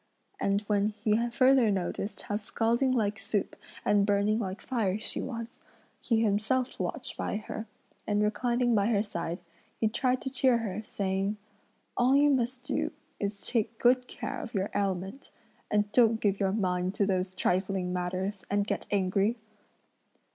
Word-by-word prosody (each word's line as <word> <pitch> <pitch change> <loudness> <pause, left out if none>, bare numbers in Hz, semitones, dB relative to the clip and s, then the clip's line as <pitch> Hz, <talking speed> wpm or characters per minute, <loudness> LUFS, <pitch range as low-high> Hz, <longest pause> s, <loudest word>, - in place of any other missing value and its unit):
And 200 +1 +1
when 205 -1 +1
he 215 +2 0
further 255 -1 +5
noticed 195 +1 -2
how 205 - -2
scalding 230 +4 +1
like 215 -4 +1
soup 205 -1 -2 0.3
and 205 -1 +4
burning 205 +2 +2
like 190 -3 -3
fire 215 -7 0
she 220 - -3
was, 230 -2 -6 0.4
he 230 -2 +1
himself 225 +5 0
watched - - -3
by - - -2
her, 220 +1 -6 0.4
and 210 0 +2
reclining 240 +3 +1
by 205 -2 +3
her 210 -3 +2
side, 170 -4 -4 0.4
he 220 - +3
tried 250 +3 +1
to 265 - -3
cheer 260 -2 +3
her, 215 -3 -3
saying: 195 0 -1 0.6
"All 250 +2 +4
you 290 +1 +5
must 255 -1 0
do - - -1 0.3
is 200 0 -3
to - - -7
take 225 -1 0
good 250 +1 +3
care - - -5
of 230 - -8
your 195 +1 0
ailment; 195 +5 -2 0.4
and 205 0 +1
don't 225 -1 +4
give 200 -2 +1
your 195 -2 +2
mind 185 -2 0
to 200 - +2
those 185 -1 -1
trifling 185 0 0
matters, 185 +2 -2
and 205 0 +1
get - - -3
angry." 200 +3 +1
210 Hz, 160 wpm, -29 LUFS, 195-235 Hz, 0.6 s, further